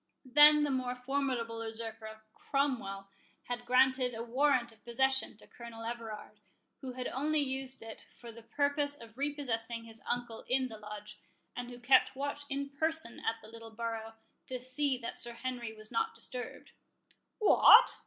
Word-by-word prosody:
Then 295 +3 +8
the 290 - +1
more 255 -1 -1
formidable 250 -3 -2
usurper, 220 -1 -7
Cromwell, 230 -9 -1 0.3
had 245 0 -5
granted 255 -1 +4
a 225 - -4
warrant 255 0 +2
of 220 -1 -20
possession 265 0 +1
to - - -16
Colonel 235 -1 -10
Everard, 220 -3 -6 0.4
who 260 -1 -6
had 250 0 -5
only 300 +4 0
used 265 -3 -2
it 225 -1 -10
for 235 -1 -10
the 230 +1 -12
purpose 285 +3 0
of 225 -1 -13
repossessing 245 -5 -2
his 225 -1 -11
uncle 240 -2 -2
in 255 0 +2
the 220 -2 -9
Lodge, 210 0 -9 0.4
and 245 0 -5
who 245 - -9
kept 260 +2 +4
watch 285 +1 -3
in 280 0 -2
person 315 -3 -1
at 225 - 0
the - - -11
little 230 0 -10
borough, 225 0 -4 0.3
to 255 -1 -4
see 255 +2 0
that 235 -1 -6
Sir 240 -1 -2
Henry 240 -1 -4
was 215 0 -12
not 450 0 0
disturbed." 250 -1 -6 0.7
"What! 425 - +8
245 Hz, 165 wpm, -33 LUFS, 225-270 Hz, 0.7 s, Then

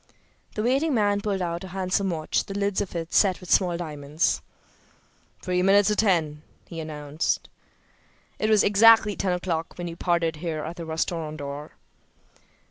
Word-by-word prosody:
The 215 - -1
waiting 270 +5 +1
man 205 -2 +2
pulled 200 -3 -1
out 170 +1 -3
a - - -7
handsome 190 +1 -1
watch, 160 -3 -1
the 195 - -6
lids 200 -1 0
of 195 -3 -5
it 165 -1 -4
set 190 -3 +3
with 180 - -9
small 180 -3 +3
diamonds. 150 -2 -1 1.0
"Three 180 -1 0
minutes 195 +2 +4
to 210 - +1
ten," 165 -8 +1 0.3
he 165 - -7
announced. 150 -1 -3 0.9
"It 215 - 0
was 215 -2 +5
exactly 210 0 +6
ten 190 - -1
o'clock 175 -2 -3
when 175 - -5
we 170 - -5
parted 170 -2 0
here 155 -1 -4
at 165 +2 -6
the 165 -1 -7
restaurant 160 -1 -3
door." 145 +1 -7
175 Hz, 165 wpm, -25 LUFS, 160-200 Hz, 1.0 s, exactly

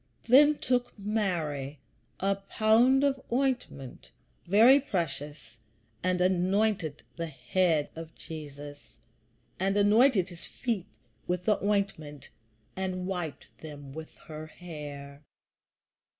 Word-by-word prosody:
Then 290 +5 +7
took 245 -2 -1
Mary 170 -10 -2 0.4
a 195 +1 +2
pound 220 +7 +3
of 275 -2 +1
ointment, 245 - -2 0.4
very 230 +9 +7
precious, 150 - -4 0.4
and 185 0 +1
anointed 185 -2 +1
the 165 -1 -3
head 160 +2 0
of 160 0 -9
Jesus, 145 - -10 0.6
and 195 +2 +1
anointed 205 -1 +4
his 175 -2 -11
feet 225 -8 -3 0.4
with 180 0 -2
the 210 - +2
ointment, 195 -9 -2 0.5
and 185 -1 -3
wiped 180 -5 -5
them 145 -3 -9
with 160 +1 -8
her 155 0 -8
hair. 145 -4 -9
180 Hz, 105 wpm, -29 LUFS, 150-210 Hz, 0.6 s, Then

